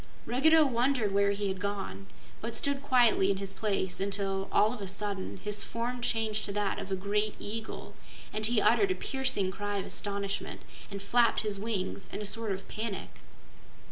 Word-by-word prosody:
Ruggedo 310 +5 +5
wondered 245 -4 +2
where 200 0 +4
he 200 0 0
had 190 -1 -2
gone, 195 - -4 0.3
but 230 +1 -3
stood 280 +2 +1
quietly 240 -8 +4
in 195 - +2
his 195 0 -5
place 195 -2 -1
until, 195 0 -1
all 215 +3 +4
of 235 - -7
a 195 - -4
sudden, 200 0 -3
his 210 0 +1
form 235 +4 -3
changed 220 -2 +1
to - - -2
that 205 -1 0
of 195 - -6
a - - +2
great 205 +2 0
eagle, 220 +2 -5 0.4
and 215 - -2
he 235 -1 +3
uttered 400 - +4
a 375 - +1
piercing 265 - -1
cry 205 +1 -3
of 195 - -2
astonishment 200 -1 -3 0.3
and 200 -1 -6
flapped 235 +2 +4
his 210 -2 -1
wings 200 -3 -2
in - - -4
a 210 - -4
sort 225 +1 -1
of 190 0 -4
panic. 215 -2 -5
205 Hz, 185 wpm, -31 LUFS, 195-230 Hz, 0.4 s, Ruggedo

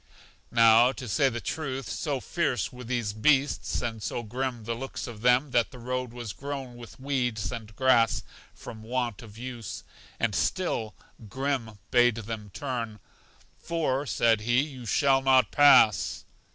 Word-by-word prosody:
Now, 115 +1 +6
to 130 - -8
say 135 +5 +2
the 120 -1 -4
truth, 135 -3 -4
so 145 -3 -2
fierce 130 - -1
were 125 0 -9
these 120 -4 -2
beasts, 140 +6 +1
and 115 -2 -4
so 120 - -3
grim 125 +1 -4
the 115 +2 -2
looks 130 +3 -6
of 110 -3 -9
them 125 +3 +3
that 120 -2 +2
the 130 - -12
road 125 0 -3
was 120 -4 -6
grown 135 -1 -6
with 120 +2 -12
weeds 125 -8 -1
and 110 -2 -8
grass 125 -3 +3 0.3
from 110 - -10
want 120 -1 -3
of 110 -2 -13
use. 120 -3 -7 0.4
And 115 -3 0
still 115 - -1 0.3
Grim 130 -4 -2
bade 120 -2 +5
them 110 -2 -6
turn, 115 -3 -4 0.6
For, 150 -5 -1
said 115 -3 +2
he, 120 +4 +2
you 135 -5 -7
shall 135 +3 +3
not 130 -1 +4
pass. 130 -9 +5
120 Hz, 155 wpm, -27 LUFS, 115-135 Hz, 0.6 s, Now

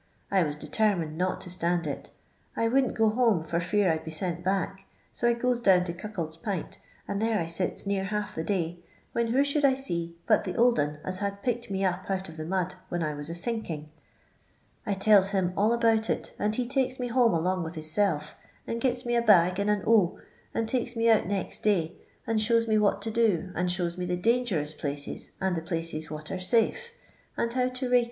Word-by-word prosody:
I 195 -2 +4
was 150 -3 0
determined 170 -2 0
not 185 +2 -1
to 180 - -8
stand 175 -1 0
it. 145 - -5 0.5
I 230 - +2
wouldn't 260 +3 +2
go 220 -1 +4
home 220 -7 +3
for 165 +1 -1
fear 180 +2 +2
I 160 - +1
'd 160 - -11
be - - -6
sent 175 +1 -4
back, 195 +1 -1 0.3
iq 240 - 0
I 240 - +4
goes 240 0 0
down 185 -5 +5
to 175 -2 -4
Cuckold's 175 -4 -5
P'int 190 -1 -4 0.3
and 200 - -2
there 225 -1 +2
I 165 - -1
sits 170 +4 -3
near 195 -1 0
half 210 +1 -3
the 160 - -3
day, 175 -3 -1 0.3
when 235 0 0
who 255 +5 +3
should 285 +1 0
I 270 -2 +5
see 170 -11 -4
but 215 - +4
the 180 -2 -4
old 240 0 +4
un 150 +1 0
as 185 0 -3
bad 200 0 -3
picked 240 -3 -1
me 195 0 0
up 185 +1 -2
out 190 0 -1
of 160 - -11
the 155 - -5
mud 185 0 -1 0.2
when 175 -1 -1
I 155 -1 -1
was 145 +1 -7
a 165 - -4
sinking, 170 -7 -4 1.0
I 200 - +1
telU 195 0 +5
him 190 -3 0
all 210 +4 +3
about 225 -2 +2
it, - - -2
and 210 +1 +1
he 250 - 0
takes 260 0 0
me 245 -1 -2
home 235 -5 +4
along 180 +3 0
with 165 +1 -5
hissel^and 155 +1 0 0.5
giu 250 0 +2
me 240 0 +1
a 235 - +4
bag 185 -4 +5
and 200 +1 +1
an 210 -1 +1
o, 210 -6 +4 0.3
and 225 - -1
takes 245 0 -1
me 230 0 +4
out 220 - +3
next 200 -2 -3
day, 180 -6 +1 0.3
and 225 -1 +1
shows 230 +1 +3
me 215 -1 +3
what 205 -1 +2
to 225 - -2
do, 205 -6 +1
and 180 0 0
shows 175 0 -1
me 180 - -2
the 180 0 0
d;ingerous 195 -8 +1
places, 145 -1 -5
and 190 -2 0
the 165 - -2
places 165 -2 -4
what 155 0 -6
are 185 - -3
safe, 235 - +1 0.5
and 235 0 0
how 250 0 +1
to 255 0 -3
rake. 250 0 +5
195 Hz, 225 wpm, -28 LUFS, 170-230 Hz, 1.0 s, down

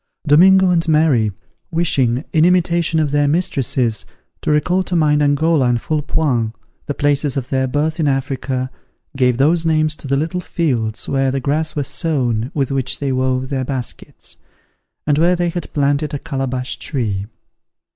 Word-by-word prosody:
Domingo 185 +5 +6
and 165 -2 +1
Mary, 150 -9 +3 0.4
wishing, 135 -6 0
in 155 - +4
imitation 170 -2 +2
of 150 -3 0
their 145 0 +2
mistresses, 135 - 0 0.4
to - - -3
recall 165 +5 +2
to 185 -1 -3
mind 150 -2 +3
Angola 145 -1 +2
and 120 -1 +1
Foullepoint, 140 -6 -1 0.3
the 145 - -3
places 145 -1 0
of 130 -1 -4
their 130 -1 0
birth 150 +5 -1
in 155 - +1
Africa, 135 -1 -2 0.4
gave 125 -3 +2
those 160 +5 +3
names 155 -1 +1
to - - -8
the 140 +1 +1
little 165 +5 -2
fields 120 -12 -2
where 135 -1 +1
the 135 +1 -1
grass 150 +4 -1
was 145 -3 -2
sown 125 -9 -1
with 140 -3 0
which 135 -1 -1
they 140 -2 -2
wove 130 0 -1
their 135 -2 -1
baskets, 130 -2 -6 0.7
and 145 0 +2
where 175 +2 +4
they 175 0 0
had 170 -1 -5
planted 145 +1 0
a - - -1
calabash 130 -2 -3
tree. 105 -9 -3
145 Hz, 165 wpm, -18 LUFS, 130-160 Hz, 0.7 s, Domingo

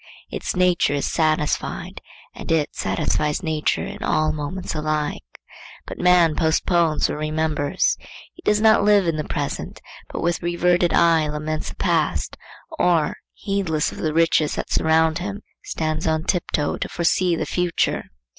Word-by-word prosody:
Its - - -3
nature 180 -5 +2
is 140 - -1
satisfied 155 -2 -1 0.3
and - - -6
it 160 -3 +1
satisfies 150 +2 -1
nature 155 -2 0
in - - -8
all 155 0 +1
moments 155 +5 -4
alike. 155 -1 -2 0.6
But - - -8
man 175 -3 +4
postpones 165 0 +2
or - - -3
remembers; 155 - 0 0.4
he 355 - -16
does 210 0 +2
not 220 -1 +5
live 205 -2 +4
in 165 -2 0
the 155 - -2
present, 145 -1 -4 0.3
but - - -4
with 170 0 0
reverted 175 0 +2
eye 165 -2 +4
laments 155 +1 -3
the - - -9
past, - - 0 0.4
or, 165 -4 +2 0.2
heedless 190 -7 -1
of - - -10
the 155 - -1
riches 160 -1 +2
that - - -5
surround 160 0 +2
him, 200 +3 -5 0.2
stands 155 0 -2
on 160 0 +1
tiptoe 165 -5 -1
to - - -4
foresee 175 0 +1
the 160 - -2
future. 175 +2 0
160 Hz, 150 wpm, -22 LUFS, 155-175 Hz, 0.6 s, not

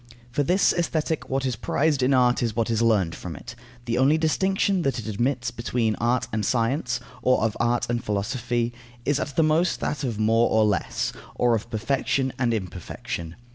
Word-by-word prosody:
For 145 - 0
this 180 +8 +3
Aesthetic, 160 -4 -1
what 135 0 0
is 130 -2 0
prized 145 +5 0
in 125 +2 +3
art 125 -2 +3
is 115 -3 -1
what 115 0 0
is 115 0 +1
learned 105 -8 +2
from 85 -2 -7
it. 120 +11 -9 0.3
The 120 +1 0
only 140 +4 +4
distinction 190 +4 +1
that 135 -6 0
it 115 - -5
admits 120 +4 -1
between 115 -1 -1
art 120 +2 +1
and 110 -1 0
science, 125 +2 0 0.2
or 115 -3 +2
art 120 0 +1
and 120 0 -1
philosophy, 120 +3 -1 0.3
is 145 0 +1
at 140 -3 -4
the 165 - +4
most 160 +3 +2
that 150 - -2
of 120 -5 -2
more 115 +2 +3
or 110 0 +4
less, 100 -6 -1 0.2
or 120 -1 +3
of 110 +1 -4
perfection 130 +3 0
and 120 -2 +2
imperfection. 90 -4 -5
120 Hz, 185 wpm, -25 LUFS, 110-140 Hz, 0.3 s, only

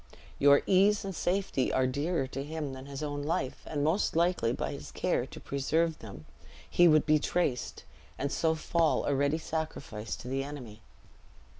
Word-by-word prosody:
Your 140 0 +6
ease 200 +2 +4
and 195 - -4
safety 180 -7 0
are 130 - +2
dearer 145 +3 0
to 135 +1 -5
him 150 -2 -4
than 130 +1 -9
his 140 +1 -6
own 145 -1 -3
life; 145 -3 -2
and 145 -2 -2
most 160 +6 +1
likely 170 -8 +2
by - - -2
his - - -8
care - - -1
to - - -10
preserve 160 +4 0
them, 100 -8 -10 0.4
he 175 - +5
would 155 -2 +5
be 155 0 +4
traced, 150 -5 -1 0.3
and 140 0 -2
so 160 -1 +1
fall 160 0 +1
a 145 - +1
ready 140 +3 +2
sacrifice 155 -10 -4
to - - -10
the 135 +1 -1
enemy." 125 -7 -8
145 Hz, 175 wpm, -30 LUFS, 135-165 Hz, 0.4 s, Your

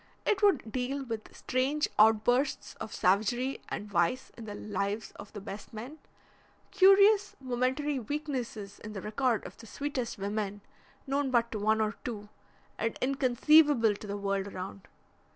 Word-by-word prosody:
It 400 - +1
would 305 - +3
deal 265 +3 -2
with 225 -3 -5
strange 270 +4 0
outbursts 225 +5 +3
of 215 - -5
savagery 220 +8 +1
and 210 - -4
vice 195 +6 0
in 230 - -9
the 205 -1 -6
lives 205 +1 -3
of 205 - -10
the 210 - -6
best 200 +1 -8
men, 250 +8 -8 0.7
curious 400 +1 +6
momentary 260 +3 -1
weaknesses 245 -6 -4
in 215 0 -8
the 195 - -5
record 230 +1 0
of - - -10
the 225 - -12
sweetest 260 -1 -3
women, 205 0 -3 0.4
known 275 0 0
but 235 -2 +2
to 215 - -3
one 215 +1 +2
or 215 0 0
two, 210 -4 -6 0.5
and 225 +1 -1
inconceivable 270 -1 +4
to 205 +1 -9
the 200 0 -3
world 200 -1 -1
around. 190 0 -7
235 Hz, 150 wpm, -30 LUFS, 210-275 Hz, 0.7 s, curious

